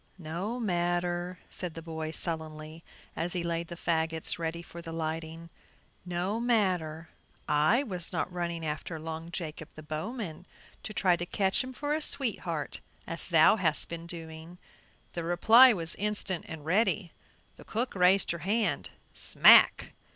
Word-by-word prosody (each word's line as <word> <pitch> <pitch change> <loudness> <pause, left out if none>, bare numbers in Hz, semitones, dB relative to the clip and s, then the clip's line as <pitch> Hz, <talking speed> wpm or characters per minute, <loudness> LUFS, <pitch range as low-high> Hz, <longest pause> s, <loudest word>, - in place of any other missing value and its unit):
"No 180 +8 -4
matter," 175 -2 -1
said 180 -3 -5
the 165 - -6
boy, 160 -1 -5
sullenly, 160 -1 -4 0.3
as 170 +2 -2
he 175 -2 -2
laid 170 0 -2
the 170 - -7
fagots 160 -1 -1
ready 165 +1 -3
for 170 0 -10
the 165 -1 -8
lighting; 165 +1 -5 0.6
"no 180 +5 -1
matter, 180 -9 0 0.4
I 155 - +3
was 180 -9 -4
not 180 - -2
running 170 -2 -3
after 155 +2 -4
Long 160 +1 -6
Jacob, 160 -2 -6
the 155 - -10
bowman, 170 +3 -5 0.3
to - - -6
try 185 -3 +3
to 175 - -3
catch 195 +3 +1
him 255 - -7
for 290 +3 -2
a 310 - -1
sweetheart, 180 - 0 0.3
as 165 - -3
thou 165 +4 +6
hast 165 -6 0
been 170 0 -6
doing." 165 0 -9 0.6
The 170 - -3
reply 225 +10 +7
was 165 -6 0
instant 205 -3 0
and 160 -3 -8
ready. 195 0 +1 0.5
The - - -12
cook 240 +3 -3
raised 185 +1 +4
her 170 - -4
hand; 210 +7 0 0.2
"smack!" - - +6
170 Hz, 150 wpm, -29 LUFS, 160-190 Hz, 0.6 s, reply